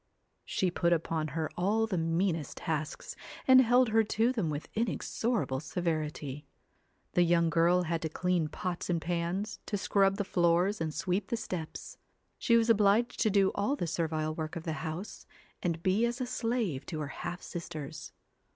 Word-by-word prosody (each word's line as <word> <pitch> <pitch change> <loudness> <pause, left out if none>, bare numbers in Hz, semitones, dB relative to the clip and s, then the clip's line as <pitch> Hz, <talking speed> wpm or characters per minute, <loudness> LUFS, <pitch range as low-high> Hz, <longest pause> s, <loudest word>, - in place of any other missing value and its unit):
She 185 -2 0
put 170 0 +2
upon 160 -1 -1
her 160 -1 0
all 210 +5 +2
the 215 -4 -2
meanest 165 -1 0
tasks, 155 0 -3 0.3
and 260 -1 +9
held 245 0 +4
her 225 +1 +4
to 225 +3 +1
them 205 -10 -1
with 150 0 -4
inexorable 225 - -1
severity. 150 -3 -3 0.6
The 180 - +3
young 170 -1 +3
girl 170 +3 +4
had 165 -1 -1
to 160 - -2
clean 180 0 0
pots 175 +4 -4
and 170 -2 +1
pans, 175 +5 -2
to 205 - -1
scrub 195 0 +2
the 205 - 0
floors 175 +2 +2
and 160 -1 -1
sweep 185 +5 -1
the 235 - -1
steps. 180 -8 -6 0.4
She 235 -2 +4
was 230 0 +3
obliged 220 +2 +3
to 220 - +3
do 195 -1 +3
all 205 +8 0
the 230 - -2
servile 160 -2 -1
work 155 -1 -4
of 165 - -5
the 160 - -2
house, 165 +6 -6 0.3
and 170 -1 -2
be 200 +5 +3
as 240 +1 -3
a 255 - -1
slave 230 - -1
to 155 - -4
her 145 - -3
half 175 - -5
sisters. 160 -4 -7
175 Hz, 175 wpm, -31 LUFS, 160-210 Hz, 0.6 s, and